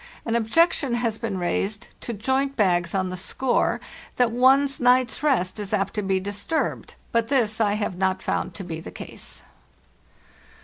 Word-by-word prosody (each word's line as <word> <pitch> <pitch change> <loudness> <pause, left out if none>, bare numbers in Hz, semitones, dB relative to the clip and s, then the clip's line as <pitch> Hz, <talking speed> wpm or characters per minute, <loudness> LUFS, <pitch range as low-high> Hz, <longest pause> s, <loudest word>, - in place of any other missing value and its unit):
An 230 - 0
objection 250 +2 +2
has 230 -2 -1
been 230 -5 -3
raised 195 +3 -2
to - - -4
joint 265 +6 0
bags 175 -5 +2
on 185 -1 0
the - - -4
score 240 +7 0 0.4
that 245 -2 +2
one's 270 +3 +4
night's 250 0 +3
rest 230 -11 +1
is 205 0 -1
apt 195 -1 -1
to 210 - -1
be 190 -1 0
disturbed, 205 +11 -2 0.2
but 230 -1 +1
this 230 -5 +1
I 205 -2 +3
have 205 -3 -2
not 190 0 0
found - - -2
to 195 - -6
be 165 -3 -5
the - - -8
case. - - -9
220 Hz, 170 wpm, -24 LUFS, 190-250 Hz, 0.4 s, one's